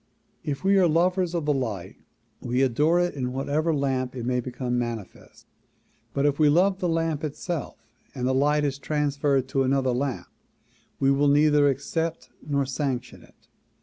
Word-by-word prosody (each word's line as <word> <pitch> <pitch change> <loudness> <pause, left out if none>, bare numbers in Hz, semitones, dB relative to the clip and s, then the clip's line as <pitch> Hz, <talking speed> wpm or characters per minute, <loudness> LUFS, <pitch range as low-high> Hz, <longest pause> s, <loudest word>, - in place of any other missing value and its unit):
If 140 -2 -4
we 195 0 +4
are 180 - +5
lovers 175 +2 +1
of 165 -3 -1
the 150 - +2
light 105 -9 -4 0.5
we 125 +2 0
adore 150 +7 +2
it 175 0 0
in 125 -3 -3
whatever 145 +5 0
lamp 135 -3 -1
it 120 -2 -5
may 125 0 0
become 125 0 -3
manifest 115 -5 -7 0.7
but 140 - 0
if 145 0 +1
we 150 -1 +5
love 185 +5 +3
the 180 -3 0
lamp 165 -2 -1
itself 155 +1 -5 0.3
and 125 -1 -2
the 130 - +2
light 150 +3 +2
is 140 -1 -1
transferred 140 -3 0
to 135 - +1
another 130 0 +1
lamp 130 +1 -2 0.7
we 135 0 +3
will 140 +1 +3
neither 145 0 +4
accept 160 +5 -3
nor 140 -2 -1
sanction 130 -2 -3
it. - - -23
140 Hz, 170 wpm, -25 LUFS, 130-155 Hz, 0.7 s, are